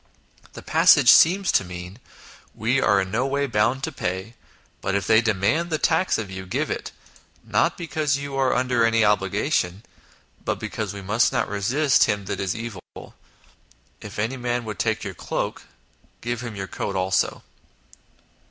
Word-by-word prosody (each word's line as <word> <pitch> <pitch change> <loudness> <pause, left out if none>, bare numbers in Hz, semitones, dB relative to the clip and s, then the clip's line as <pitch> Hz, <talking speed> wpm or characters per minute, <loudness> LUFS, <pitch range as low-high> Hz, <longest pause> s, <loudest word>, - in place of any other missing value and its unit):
The - - -10
passage - - +6
seems 190 +3 +5
to - - +3
mean: 90 +3 -9 0.3
" - - -22
We 120 +5 +1
are 100 -1 +3
in 95 -1 -4
no 120 +5 0
way 140 +1 0
bound 120 +2 0
to - - -2
pay, 95 +5 -4 0.5
but 95 0 -1
if 100 -2 0
they 110 +2 +5
demand 110 - 0
the 155 - 0
tax 165 +4 +1
of 105 -4 -5
you, 95 0 -7
give - - -2
it, - - -4 0.5
not - - +1
because 155 -4 -1
you 140 0 -6
are 135 -1 +2
under 125 0 0
16 115 - +5
INTRODUCTION 115 - 0
any 110 - +4
obligation, 105 -2 0 0.6
but - - -1
because 105 -3 -4
we 100 -1 -8
must 105 +5 +2
not - - 0
resist 120 +7 +2
him 105 -1 -2
that - - -4
is 95 -2 -2
evil. 115 -5 -6 1.2
If - - -9
any 115 +6 -2
man 120 -1 -2
would 105 -3 -6
take 110 -1 0
your 100 -2 -5
cloak, - - -4 0.6
give 120 0 -3
him 120 -3 -6
your 95 -1 -4
coat 100 +1 -5
also." 95 0 0
110 Hz, 180 wpm, -23 LUFS, 100-130 Hz, 1.2 s, passage